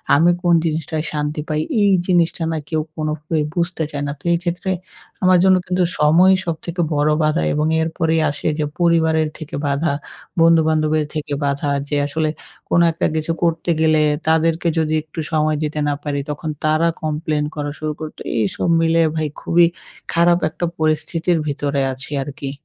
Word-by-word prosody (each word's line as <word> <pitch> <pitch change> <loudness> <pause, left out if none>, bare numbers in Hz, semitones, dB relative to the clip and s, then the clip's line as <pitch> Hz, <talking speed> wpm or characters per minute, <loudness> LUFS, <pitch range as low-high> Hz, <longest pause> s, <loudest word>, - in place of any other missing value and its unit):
আমি 165 +4 +4
কোন 175 -2 +3
জিনিসটায় 160 0 -2
শান্তি 150 0 -2
পাই, 155 0 0 0.2
এই 200 - +4 0.2
জিনিসটা 175 -2 +2
না 160 - -1
কেউ 160 -1 0
কোনোভাবেই 155 0 -2
বুঝতে 170 -1 -1
চায় 145 -1 -3
না। - - -2
তো - - -28
এই 170 - +3
ক্ষেত্রে 175 +2 -2 0.5
আমার 185 0 +6
জন্য 190 0 +6
কিন্তু 180 0 +1 0.2
সময়ই 175 +6 +5
সবথেকে 170 +1 -3
বড় 145 +1 +2
বাধা 155 +2 +1
এবং 150 +1 +1
এরপরেই 160 0 0
আসে 145 - -4
যে 150 - +1
পরিবারের 160 -2 +3
থেকে 155 0 -7
বাধা, 140 +2 0 0.5
বন্ধুবান্ধবের 155 -2 +3
থেকে 150 -2 -4
বাধা 140 +1 -1 0.2
যে 150 - -1
আসলে 155 +1 -1 0.4
কোনো 170 - +4
একটা 165 - 0
কিছু 160 +1 -1
করতে 165 0 0
গেলে 155 -1 +4 0.3
তাদেরকে 160 +1 +2
যদি 155 -1 0
একটু 155 +1 -9
সময় 155 -1 +1
দিতে 150 0 -2
না 145 - +1
পারি 145 -1 -2
তখন 150 +2 -4
তারা 155 +2 +2
complain 155 -1 -1
করা 145 -1 -3
শুরু 155 0 -2
করে, 155 -1 -5
তো - - -7
এইসব 110 - -1
মিলে 165 0 +3
ভাই 155 -1 0
খুবই 170 0 +4 0.5
খারাপ 170 +1 +4
একটা 160 +3 -3
পরিস্থিতির 160 +2 0
ভিতরে 140 -1 -1
আছি 130 +3 -10
আর 140 - -7
কি। 135 -1 -4
155 Hz, 170 wpm, -19 LUFS, 150-170 Hz, 0.5 s, আমার